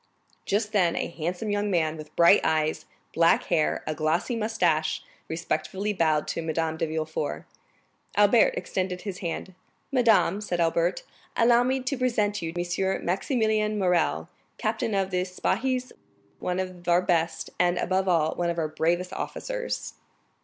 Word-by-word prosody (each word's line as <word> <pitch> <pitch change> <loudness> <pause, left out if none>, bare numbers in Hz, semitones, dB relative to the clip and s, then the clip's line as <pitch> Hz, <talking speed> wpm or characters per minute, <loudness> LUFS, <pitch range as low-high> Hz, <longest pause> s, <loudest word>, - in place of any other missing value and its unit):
Just 210 +1 0
then, 185 -5 +2
a - - -1
handsome 175 +6 -3
young 205 0 0
man, 160 -4 +1
with 155 -1 -11
bright 170 +4 +6
eyes, 155 -1 0 0.3
black 165 0 +4
hair, 155 -2 +1
and 155 - -2
glossy 160 +10 0
moustache, 185 -9 0 0.2
respectfully 190 +5 -2
bowed 155 -5 +1
to - - -2
Madame 160 0 -1
de 160 - -1
Villefort. 155 -1 -3 0.7
Albert - - +5
extended 185 - -2
his 195 -3 -6
hand. 180 +1 -4 0.4
"Madame," 225 -6 +3
said 180 -4 -2
Albert, 170 +1 +1 0.3
"allow 235 +1 +5
me 260 +2 +1
to 260 +2 -2
present 225 -5 +1
to 165 - -3
you 165 - -5
M. 175 +2 -1
Maximilian 215 +2 +1
Morrel, 170 - +1 0.3
captain 220 - -1
of 195 -1 0
Spahis, 220 +8 -1 0.5
one 180 0 -2
of 185 -2 -5
our 175 +1 +4
best, 170 -2 0
and, 175 0 +3
above 190 +1 0
all, 160 -3 +3
of 170 0 0
our 160 -2 0
bravest 175 +4 0
officers." - - -4
180 Hz, 145 wpm, -26 LUFS, 165-210 Hz, 0.7 s, bright